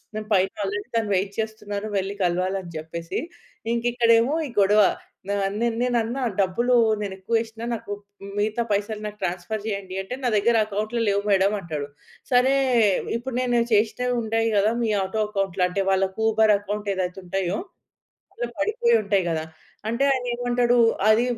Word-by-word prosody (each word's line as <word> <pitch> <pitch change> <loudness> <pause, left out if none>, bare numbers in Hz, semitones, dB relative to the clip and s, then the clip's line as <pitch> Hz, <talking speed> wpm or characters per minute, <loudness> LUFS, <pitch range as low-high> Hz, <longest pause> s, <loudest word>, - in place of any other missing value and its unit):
నేను 215 0 -4
పైన 190 -1 +4
ఆల్రెడీ 205 +3 -3
తను 225 -2 +1
వెయిట్ 195 +1 0
చేస్తున్నారు 215 -2 -3
వెళ్లి 195 +1 -1
కలవాలని 185 +1 -1
చెప్పేసి. 165 +2 -5 0.5
ఇంక 235 0 -1
ఇక్కడేమో 235 +2 +4
ఈ - - -7
గొడవ 205 +2 +5 0.5
నా‌ 200 - 0 0.2
న్ - - +1 0.2
నే‌నన్నా 245 +1 0 0.2
డబ్బులు 235 +7 +2 0.3
నేను 200 -2 -3
ఎక్కువ 195 +5 -3
వేష్న 225 0 -6 0.8
మిగతా 215 +3 0
పైసలు 205 +1 -1
నాకు 210 0 -7
ట్రాన్‌స్‌ఫర్ 180 +5 -3
జేయండి 200 -3 -4
అంటే 195 +6 -6
నా 250 - +1
దగ్గర 230 +3 +3
అకౌంట్‌లో 215 +3 -2
లేవు 200 0 +1
మేడమ్ 195 +1 +3
అంటడు. 155 -5 -5 0.4
సరే 250 +2 +5 0.6
ఇప్పుడు 240 +2 -5
నేను 245 -1 +2
చేషినవి 230 +4 +2
ఉంటాయి 225 +1 0
గదా! 210 +2 +3
మీ 225 - +1
ఆటో 190 +3 -2
అకౌంట్‌లో. 195 -3 -1
అంటే 195 +2 -1
వాళ్ళకి 190 0 0
ఊబర్ 220 -1 +4
అకౌంట్ 205 0 -4
ఏదైతే 185 0 -3
ఉంటాయో 185 +1 -1 0.8
ఇట్లా - - -3
పడిపోయి 470 +2 +2
ఉంటాయి 195 -3 +1
గదా! 160 -1 -1 0.4
అంటే 235 +4 0
ఆయన 255 -2 -2
ఏమంటాడు, 245 0 +2 0.3
అది 220 +2 +5
210 Hz, 155 wpm, -24 LUFS, 195-235 Hz, 0.8 s, గొడవ